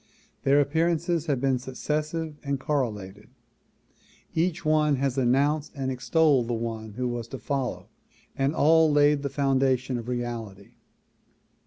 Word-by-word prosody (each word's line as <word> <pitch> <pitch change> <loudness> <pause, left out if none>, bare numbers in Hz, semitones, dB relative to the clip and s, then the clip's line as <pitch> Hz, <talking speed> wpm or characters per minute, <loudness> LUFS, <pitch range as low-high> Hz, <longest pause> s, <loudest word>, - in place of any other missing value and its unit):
Their 140 +1 +4
appearances 165 +3 +1
have 140 -4 +1
been 135 -1 +1
successive 150 +5 -3
and 140 -1 -2
correlated; 105 -8 -3 1.0
each 170 +1 -1
one 155 -1 +3
has 135 -1 -1
announced 140 +4 +1
and 135 -2 -2
extolled 135 -1 +2
the 120 - -1
one 110 -2 -5
who 125 +3 -2
was 120 -1 -4
to 135 - -7
follow 130 +2 -3 0.5
and 135 +3 0
all 160 +1 +5
laid 145 0 +4
the 140 - -2
foundation 135 -3 +1
of 115 - -8
reality. 120 -5 -5
135 Hz, 135 wpm, -26 LUFS, 120-150 Hz, 1.0 s, all